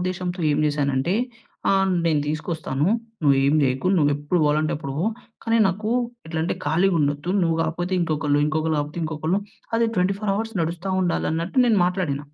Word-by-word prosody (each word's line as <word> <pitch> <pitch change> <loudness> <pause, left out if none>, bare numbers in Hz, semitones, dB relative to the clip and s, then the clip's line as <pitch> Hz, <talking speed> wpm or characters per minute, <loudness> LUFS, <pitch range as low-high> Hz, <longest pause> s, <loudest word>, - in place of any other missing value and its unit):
ఉద్దేశంతో 180 0 -3
ఏం 145 - +1
జేశానంటే, 145 +1 0 0.6
ఆహ్, 195 -1 +2
నేను 155 -3 +2
తీసుకొస్తాను. 150 -2 -2 0.4
నువ్వు 140 -2 +5
ఏమి 145 +3 +3
జేయకు. 130 +5 +1
నువ్వు 145 -4 +3
ఎప్పుడు 145 +5 -1
పోవాలంటే 150 +1 +2
అప్పుడు 140 -2 -6
పో. 180 - 0 0.4
కానీ, 230 0 +2
నాకు 210 +4 -2 0.4
ఎట్లా 160 0 -3
అంటే 170 - -1
ఖాళీగా 180 +3 +2
ఉండొద్దు. 145 +3 -1
నువ్వు 165 -1 +1
గాకపోతే 175 +3 -2
ఇంకొకళ్ళు. 150 -3 +1
ఇంకొకళ్ళు 155 +1 0
గాకపోతే 150 +3 -5
ఇంకొకళ్ళు. 160 +5 -1 0.4
అది 230 0 +3
24 195 +3 +1
అవర్స్ 225 +2 -3
నడుస్తా 175 +4 -3
ఉండాలి 175 -2 0
అన్నట్టు 165 +10 -2
నేను 220 -4 +4
మాట్లాడిన. 180 -7 -1
160 Hz, 165 wpm, -23 LUFS, 150-185 Hz, 0.6 s, నువ్వు